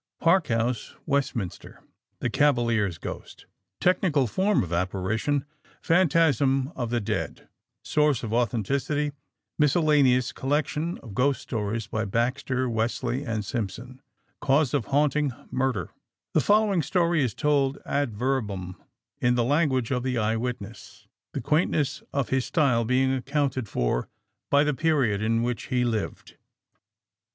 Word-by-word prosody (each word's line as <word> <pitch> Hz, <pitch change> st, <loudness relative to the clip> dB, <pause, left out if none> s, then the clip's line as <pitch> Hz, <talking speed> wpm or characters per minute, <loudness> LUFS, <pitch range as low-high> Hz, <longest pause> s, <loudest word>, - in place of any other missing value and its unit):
PARK 170 Hz, 0 st, +3 dB
HOUSE, 115 Hz, +1 st, -1 dB
WESTMINSTER 135 Hz, -, -3 dB, 0.4 s
THE -, -, -1 dB
CAVALIER'S 115 Hz, -, +2 dB
GHOST -, -, -8 dB, 0.3 s
Technical 175 Hz, -6 st, +2 dB
form 190 Hz, -, +1 dB
of 90 Hz, -1 st, -5 dB
apparition: 100 Hz, +10 st, -1 dB, 0.3 s
Phantasm 145 Hz, -6 st, +3 dB
of 120 Hz, -3 st, -3 dB
the 120 Hz, 0 st, 0 dB
dead 105 Hz, -, -4 dB, 0.4 s
Source 150 Hz, -5 st, +2 dB
of 110 Hz, -1 st, -3 dB
authenticity: 130 Hz, +6 st, 0 dB, 0.5 s
Miscellaneous 145 Hz, -4 st, +3 dB
collection 150 Hz, +4 st, -1 dB
of 115 Hz, -6 st, -9 dB
Ghost 135 Hz, +5 st, +1 dB
Stories 110 Hz, 0 st, -3 dB
by 110 Hz, 0 st, -2 dB
Baxter, 125 Hz, +4 st, 0 dB
Wesley 120 Hz, +3 st, -1 dB
and 110 Hz, -5 st, -3 dB
Simpson 120 Hz, +4 st, -5 dB, 0.4 s
Cause 140 Hz, -1 st, +2 dB
of 110 Hz, -, +1 dB
haunting: 145 Hz, -1 st, +1 dB, 0.2 s
Murder 130 Hz, -9 st, -1 dB, 0.4 s
(The -, -, +4 dB
following 205 Hz, -3 st, +3 dB
story 170 Hz, +1 st, +1 dB
is 120 Hz, -5 st, -2 dB
told 140 Hz, -2 st, +1 dB
ad 140 Hz, -3 st, 0 dB
verbum 105 Hz, -7 st, -2 dB, 0.4 s
in 120 Hz, 0 st, +2 dB
the 120 Hz, -, +2 dB
language 130 Hz, -3 st, +1 dB
of 125 Hz, -2 st, +1 dB
the 125 Hz, -1 st, -1 dB
eye 110 Hz, 0 st, +1 dB
witness, 115 Hz, -2 st, -6 dB, 0.3 s
the -, -, -3 dB
quaintness 150 Hz, +1 st, +1 dB
of 140 Hz, -3 st, -1 dB
his 130 Hz, -1 st, +1 dB
style 130 Hz, -8 st, +2 dB
being 130 Hz, +2 st, +2 dB
accounted 135 Hz, -3 st, -1 dB
for -, -, -1 dB, 0.4 s
by 140 Hz, +1 st, +5 dB
the 150 Hz, 0 st, +1 dB
period 135 Hz, -9 st, +1 dB
in 115 Hz, +1 st, +1 dB
which 120 Hz, -2 st, -2 dB
he 125 Hz, -2 st, +1 dB
lived.) 110 Hz, -4 st, -3 dB
130 Hz, 130 wpm, -26 LUFS, 115-145 Hz, 0.5 s, by